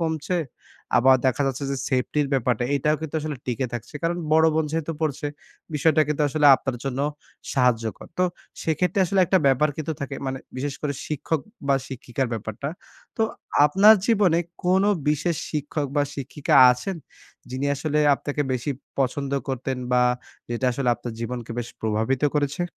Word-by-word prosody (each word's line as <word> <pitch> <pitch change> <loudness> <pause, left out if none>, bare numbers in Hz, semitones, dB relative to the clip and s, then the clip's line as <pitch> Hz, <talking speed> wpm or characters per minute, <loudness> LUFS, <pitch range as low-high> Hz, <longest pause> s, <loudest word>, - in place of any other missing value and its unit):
কমছে। 160 +2 -1 0.6
আবার 130 +2 +6
দেখা 130 +2 +2
যাচ্ছে 135 +1 -2
যে, 135 - -1
সেফটি 130 +3 0
র - - -3
ব্যাপারটা, 125 -2 +1
এটাও 150 +3 +1
কিন্তু 160 -1 -6
আসলে 150 -2 -4
টিকে 125 +1 -1
থাকছে। 120 +4 -6
কারণ 170 +1 0 0.2
বড় 160 +1 +6
বোন 160 -1 +2
যেহেতু 165 0 -1
পড়ছে, 150 -2 -1 0.5
বিষয়টা 155 +1 +3
কিন্তু 150 0 0
আসলে 150 +1 +3
আপনার 130 -2 -4
জন্য 135 -1 -2 0.5
সাহায্যকর। 115 -4 +1
তো 185 - +4 0.4
সেক্ষেত্রে 175 +4 +1
আসলে 195 +2 +2
একটা 190 - +4
ব্যাপার 135 +3 +4
কিন্তু 155 0 -3
থাকে। 140 0 -4
মানে 130 0 -2 0.2
বিশেষ 140 +1 -3
করে 145 -1 0
শিক্ষক, 150 +1 -1 0.3
বা 140 - +5
শিক্ষিকার 130 0 -3
ব্যাপারটা। 110 +5 -4 0.5
তো 225 - +1 0.4
আপনার 200 +8 +7
জীবনে 200 -7 +4 0.3
কোনো 190 +3 +3 0.2
বিশেষ 155 +2 +1
শিক্ষক, 150 -1 -2
বা 145 - +4
শিক্ষিকা 140 +1 -1 0.2
আছেন? 170 +9 -4 0.5
যিনি 130 +2 -2
আসলে 150 +2 -1 0.2
আপনাকে 145 +1 -3
বেশি 130 +3 -2 0.3
পছন্দ 135 +1 0 0.2
করতেন? 130 0 -2 0.2
বা 125 0 +5 0.5
যেটা 120 +2 -1
আসলে 125 0 -1
আপনার 120 -1 -7
জীবনকে 120 0 -5 0.3
প্রভাবিত 110 +5 0
করেছে? 145 +4 0
140 Hz, 160 wpm, -24 LUFS, 130-160 Hz, 0.6 s, আপনার